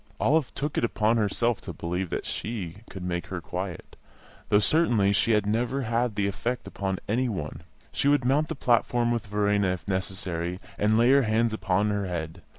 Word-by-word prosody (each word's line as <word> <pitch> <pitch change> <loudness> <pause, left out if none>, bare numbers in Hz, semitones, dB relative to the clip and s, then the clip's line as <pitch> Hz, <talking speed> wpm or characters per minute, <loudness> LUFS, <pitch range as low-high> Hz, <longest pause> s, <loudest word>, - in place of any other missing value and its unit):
Olive 155 -1 +2
took 145 +1 -3
upon 115 0 +2
herself 115 +2 +1
to - - -7
believe 90 +2 -3
that - - -3
she 100 -7 -4
could 95 - -7
make 85 -1 -3
her 95 - -4
quiet, 90 +1 -6 0.5
though, 105 - +5
certainly, 110 -5 +3
she 110 +3 +3
had 105 -2 +2
never 120 +6 0
had 120 -1 0
that 100 -1 +1
effect 120 +5 -2
upon 95 -1 -3
any 125 +4 +1
one; 80 -6 -4 0.3
she - - 0
would 145 -3 +3
mount 145 +4 +3
the 160 - -4
platform 120 -1 +2
with 115 -2 -2
Verena 105 -1 +1
if 90 +1 -3
necessary, 95 -2 -2 0.2
and 105 +1 +3
lay 120 +3 +5
her 140 0 +6
hands 115 -1 +1
upon 100 0 +1
her 100 -1 -1
head. 85 0 -4
105 Hz, 185 wpm, -27 LUFS, 95-120 Hz, 0.5 s, her